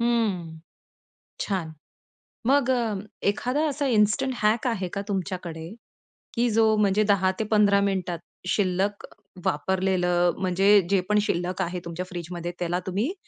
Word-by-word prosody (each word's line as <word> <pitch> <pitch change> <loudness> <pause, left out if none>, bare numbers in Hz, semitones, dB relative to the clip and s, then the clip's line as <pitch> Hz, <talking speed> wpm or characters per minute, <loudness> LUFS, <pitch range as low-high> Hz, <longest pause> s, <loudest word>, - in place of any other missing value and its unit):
हम्म. 200 -9 0 0.8
छान. 175 -6 -2 0.7
मग 270 -1 +3
अ, 235 -4 +1 0.3
एखादा 255 +9 0
असा 285 0 -2
इन्स्टंट 215 +6 +2
हॅक 220 +4 +2
आहे 195 -6 -1
का 200 - -2
तुमच्याकडे 180 -4 -4 0.7
की 240 0 +2
जो 220 0 +4
म्हणजे 210 0 +3
10-15 200 +1 +3
मिनिटात, 185 -4 -1 0.3
शिल्लक, 195 +1 0 0.4
वापरलेलं, 180 +1 +1
म्हणजे 195 +2 +4
जे 195 - +4
पण 210 0 +3
शिल्लक 180 -2 -1
आहे 175 +1 -3
तुमच्या 170 +2 -4
फ्रिजमध्ये 175 -1 -5
त्याला 175 +1 -1
तुम्ही 210 - -1
195 Hz, 120 wpm, -25 LUFS, 180-215 Hz, 0.8 s, जो